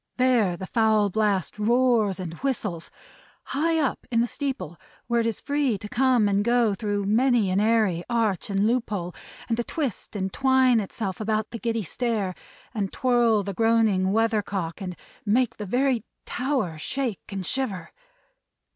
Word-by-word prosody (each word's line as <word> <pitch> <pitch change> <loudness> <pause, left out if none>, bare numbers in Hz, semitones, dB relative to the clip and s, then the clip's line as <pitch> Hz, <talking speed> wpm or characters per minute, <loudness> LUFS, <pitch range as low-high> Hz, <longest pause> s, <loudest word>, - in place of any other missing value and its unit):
There 240 -8 +3
the 190 - -6
foul 215 -1 +2
blast 210 -1 0
roars 230 -3 +2
and 175 -3 -5
whistles! 210 -11 -2 0.5
High 325 +4 0
up 290 -5 -1
in 230 - +1
the 235 - +3
steeple, 250 - -4 0.3
where 235 0 +1
it 230 - +1
is 225 - -2
free 280 -6 0
to 210 - -8
come 250 -1 +3
and 200 0 +2
go 235 -2 +3
through 205 0 -2
many 225 -1 +3
an 190 - +2
airy 210 -5 +2
arch 225 -5 0
and 200 0 +1
loophole, 215 -7 -1 0.3
and 230 - 0
to 240 - 0
twist 260 - -4
and 190 -1 -2
twine 260 -3 +4
itself 195 -1 -4
about 215 0 -1
the 230 - -6
giddy 230 -2 -1
stair, 210 0 -2 0.4
and 200 -4 -2
twirl 240 -4 +2
the 200 0 -4
groaning 220 -3 +2
weathercock, 205 -5 0
and 180 -2 -5 0.3
make 230 +3 +1
the 210 - -6
very 250 +1 +1 0.2
tower 250 - -2
shake 250 - -3
and 195 -2 -4
shiver! 205 -7 -2
220 Hz, 160 wpm, -25 LUFS, 195-245 Hz, 0.5 s, twine